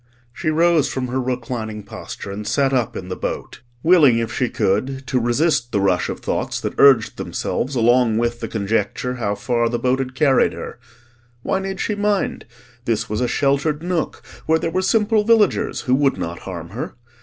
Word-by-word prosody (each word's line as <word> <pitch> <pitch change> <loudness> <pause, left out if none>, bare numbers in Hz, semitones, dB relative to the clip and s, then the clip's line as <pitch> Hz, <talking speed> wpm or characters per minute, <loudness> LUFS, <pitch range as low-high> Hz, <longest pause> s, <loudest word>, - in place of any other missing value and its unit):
She 155 - -2
rose 165 -1 +3
from 130 -1 -3
her 130 +2 -1
reclining 120 -4 -4
posture 100 0 -8
and 105 +1 -6
sat 135 -1 +1
up 125 -4 0
in 90 - -7
the 90 - -3
boat, - - -5 0.2
willing, 155 -8 +6
if 115 -1 -2
she 125 - 0
could, 130 +7 -1
to 130 -1 0
resist 120 +1 +1
the 100 - +1
rush 95 -2 +1
of - - -5
thoughts - - -2
that - - -3
urged 130 -6 +5
themselves 135 +2 -3
along 120 -1 +3
with 120 0 0
the - - -4
conjecture 115 +4 -1
how 100 -4 -1
far 115 +3 0
the 120 - -1
boat 130 +2 +1
had 130 -1 -4
carried 135 -1 +3
her. - - -8 0.6
Why 190 - 0
need 195 0 -4
she - - -1
mind? 205 -1 -1 0.4
This 110 -2 -1
was 105 - -1
a 125 - +1
sheltered 140 +4 0
nook 175 -2 -2 0.2
where 160 +1 +4
there 165 0 -2
were 185 +2 0
simple 215 +2 +2
villagers 225 -1 +2
who 125 - 0
would 135 -2 +2
not 85 -1 -4
harm 85 -3 -7
her. 115 +8 -6
125 Hz, 190 wpm, -21 LUFS, 115-155 Hz, 0.6 s, willing